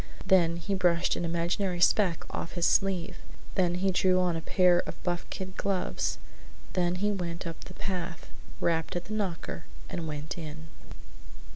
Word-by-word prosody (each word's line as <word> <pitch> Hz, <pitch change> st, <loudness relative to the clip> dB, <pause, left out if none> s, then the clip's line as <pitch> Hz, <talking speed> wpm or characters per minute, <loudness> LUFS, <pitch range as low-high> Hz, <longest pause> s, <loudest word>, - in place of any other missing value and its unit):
Then 170 Hz, -3 st, +5 dB
he 175 Hz, +4 st, -3 dB
brushed 175 Hz, -2 st, +3 dB
an 175 Hz, -, -2 dB
imaginary 175 Hz, +2 st, 0 dB
speck 180 Hz, -1 st, +3 dB
off 170 Hz, -, -4 dB
his 175 Hz, -2 st, +1 dB
sleeve, 190 Hz, -4 st, +2 dB, 0.4 s
then 175 Hz, -2 st, +2 dB
he 190 Hz, +2 st, +2 dB
drew 185 Hz, 0 st, +4 dB
on 180 Hz, -2 st, +2 dB
a 165 Hz, -, -2 dB
pair 180 Hz, +1 st, +4 dB
of -, -, -4 dB
buff 175 Hz, -1 st, -2 dB
kid 185 Hz, 0 st, -6 dB
gloves, 195 Hz, -2 st, 0 dB, 0.6 s
then 180 Hz, -1 st, +2 dB
he 205 Hz, +3 st, +1 dB
went 175 Hz, -3 st, -3 dB
up 165 Hz, -1 st, -6 dB
the -, -, -10 dB
path, 180 Hz, -3 st, -4 dB, 0.3 s
rapped 165 Hz, 0 st, 0 dB
at 175 Hz, -, -2 dB
the 215 Hz, -, -5 dB
knocker, 170 Hz, -, -3 dB, 0.3 s
and 170 Hz, -2 st, -3 dB
went 150 Hz, +2 st, -4 dB
in. 150 Hz, -, -7 dB
175 Hz, 165 wpm, -29 LUFS, 170-185 Hz, 0.6 s, Then